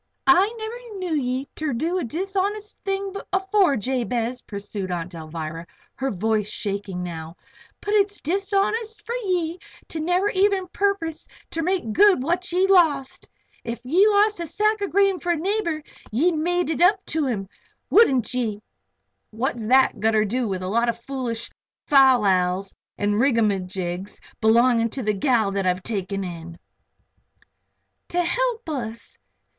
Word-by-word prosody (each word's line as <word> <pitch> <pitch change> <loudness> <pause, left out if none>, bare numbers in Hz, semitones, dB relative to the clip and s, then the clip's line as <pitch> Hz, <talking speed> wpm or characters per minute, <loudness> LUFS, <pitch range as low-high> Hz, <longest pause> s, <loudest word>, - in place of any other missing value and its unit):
"I 370 +4 +5
never 450 0 -7
knew 365 -3 -3
ye 260 -1 -1
ter 310 -3 -2
do 330 +10 -1
a - - -2
dishonest 390 - -2
thing 390 0 -2 0.2
afore, 380 -5 +2
Jabez," 245 +1 -2
pursued 200 -2 -6
Aunt 175 0 -4
Alvirah, 160 0 -6
with - - -30
her 270 0 -1
voice 210 0 0
shaking 200 -3 -4
now. 165 -1 -7 0.4
"But 415 - -2
it's 410 -1 +2
dishonest 400 +5 -1
for 465 - -4
ye 365 -7 -1 0.3
to 320 - -4
never 360 +5 +1
even 385 -1 +2
perpose 380 -6 -1 0.2
ter 330 - -2
make 350 - -1
good 395 -8 +5
what 350 +4 -1
ye 365 +2 +3
lost. 320 -9 +2 0.3
If 230 0 -4
you'd 370 +11 +4
lost 415 -1 +3
a 340 - -3
sack 425 +5 +1
of 400 - -1
grain 390 -1 +3
for 350 - 0
a - - -2
neighbor 340 -3 -1 0.3
ye'd 315 +11 +2
made 345 +2 0
it 320 - -2
up 385 +2 +4
to 305 -2 -1
him; 200 -6 -2 0.4
wouldn't 265 - +4
ye?" 225 -5 -1 0.7
"What's 230 0 -3
thet 265 +2 +4
gotter 220 -1 +3
do 240 +3 -1
with 185 -2 -3
a - - -3
lot 235 +4 +1
of 235 0 -2
foolish 240 -3 -4 0.3
fal 265 -4 +6
lals 185 -1 +1 0.2
an' 205 0 +1
rigamagigs 195 -6 0 0.2
belonging 230 +1 +4
to 265 - -5
a 210 - +3
gal 220 -1 +2
that 195 -1 -1
I've 180 0 0
taken 195 -2 -3
in 170 -2 -7 0.8
" - - -41
"To 355 0 +1
help 480 +3 -1
us. 235 -7 -5
270 Hz, 155 wpm, -23 LUFS, -, 0.8 s, fal